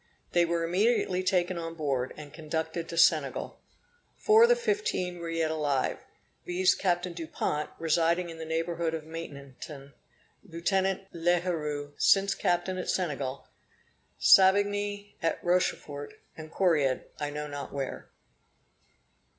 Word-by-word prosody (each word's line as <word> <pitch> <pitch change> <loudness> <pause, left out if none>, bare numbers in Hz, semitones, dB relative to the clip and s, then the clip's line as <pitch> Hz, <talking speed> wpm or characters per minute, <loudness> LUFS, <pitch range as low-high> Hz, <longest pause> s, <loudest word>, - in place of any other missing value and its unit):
They 175 -1 +4
were 170 0 -1
immediately 185 +1 +1
taken 185 -1 +1
on 165 0 -5
board, 135 -5 -1
and 150 -1 -10
conducted 160 +1 -4
to 170 - -6
Senegal. 155 -4 +2 0.6
Four 435 +1 +5
of 470 - +7
the 485 - +6
fifteen 425 - -1
are 170 0 -5
yet 165 -1 0
alive, 145 -4 0 0.4
viz. 180 +1 +2
Captain 180 -1 -1
Dupont, 155 -2 -3
residing 170 +2 +1
in 165 - -10
the - - -5
neighborhood 165 +1 -1
of 160 - -6
Maintenon, 140 -3 -9 0.5
Lieutenant 190 +1 -1
L'Heureux, 165 -4 -1
since 195 0 +4
Captain 185 0 0
at - - -4
Senegal, 140 -7 -2 0.7
Savigny, 205 +1 +4
at 165 - 0
Rochefort, 150 -5 -1 0.2
and 155 0 -10
Correard, 150 -8 +2
I 145 - -2
know 150 +1 -4
not 145 -2 -6
where. 135 -2 -5
165 Hz, 125 wpm, -29 LUFS, 150-185 Hz, 0.7 s, of